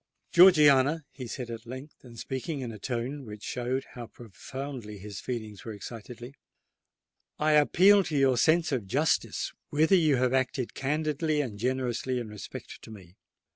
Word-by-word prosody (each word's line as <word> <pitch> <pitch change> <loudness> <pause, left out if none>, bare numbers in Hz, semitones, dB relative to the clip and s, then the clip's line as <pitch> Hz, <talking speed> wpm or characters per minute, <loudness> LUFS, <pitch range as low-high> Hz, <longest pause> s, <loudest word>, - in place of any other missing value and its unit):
"Georgiana," 150 -4 +6
he 130 -3 -8
said, 120 0 -6
at 115 0 -8
length, 130 +5 -10
and 120 -2 -13
speaking 135 +5 -4
in 120 -3 -5
a 110 - -10
tone 125 +6 -4
which 105 -3 -10
showed 125 +2 -2
how 120 -2 -8
profoundly 120 +1 -8
his 100 0 -8
feelings 110 -5 -6
were 110 - -6
excited,—"I 120 +7 -8
appeal 185 +7 +5
to 150 - -2
your 135 -2 +3
sense 165 +3 +3
of 120 -8 -2
justice 150 +10 0 0.2
whether 160 +5 +2
you 155 -6 +4
have 130 0 +1
acted 130 -1 -1
candidly 150 +2 -1
and 115 -8 -3
generously 125 +1 -1
in 115 -3 -6
respect 105 -1 -9
to - - -13
me? 95 -5 -13
130 Hz, 155 wpm, -28 LUFS, 115-150 Hz, 0.2 s, Georgiana